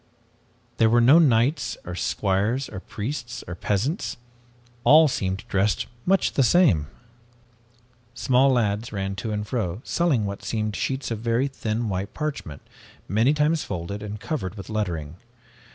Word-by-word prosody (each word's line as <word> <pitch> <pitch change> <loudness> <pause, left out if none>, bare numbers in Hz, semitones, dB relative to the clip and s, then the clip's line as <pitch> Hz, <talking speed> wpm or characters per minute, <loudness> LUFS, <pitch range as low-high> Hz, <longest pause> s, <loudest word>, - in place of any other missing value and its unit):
There 115 -1 +4
were 120 +1 +4
no 130 +8 +7
knights 140 0 +2
or 90 - -5
squires, 105 +8 0
or - - -6
priests 120 +4 -5
or 85 - -5
peasants. 105 - -2 0.7
All 155 +4 +7
seemed 95 -8 -2
dressed 100 +2 +1 0.2
much 195 +1 +3
the - - +2
same. 130 - +4 1.3
"Small 130 +2 +3
lads 115 -3 0
ran 95 -1 -3
to 110 - -3
and 105 0 -2
fro 105 -6 -2
selling 150 -11 +1
what 100 0 -5
seemed 110 -2 -2
sheets 130 -2 -2
of 110 - -2
very 115 +4 +1
thin 115 -4 -3
white 95 0 -3
parchment, 140 - -4 0.4
many 115 - +3
times 150 +1 +2
folded 100 +2 -5
and 105 0 -6
covered 105 - -4
with 100 +1 -9
lettering. 85 -7 -3
110 Hz, 145 wpm, -24 LUFS, 100-135 Hz, 1.3 s, no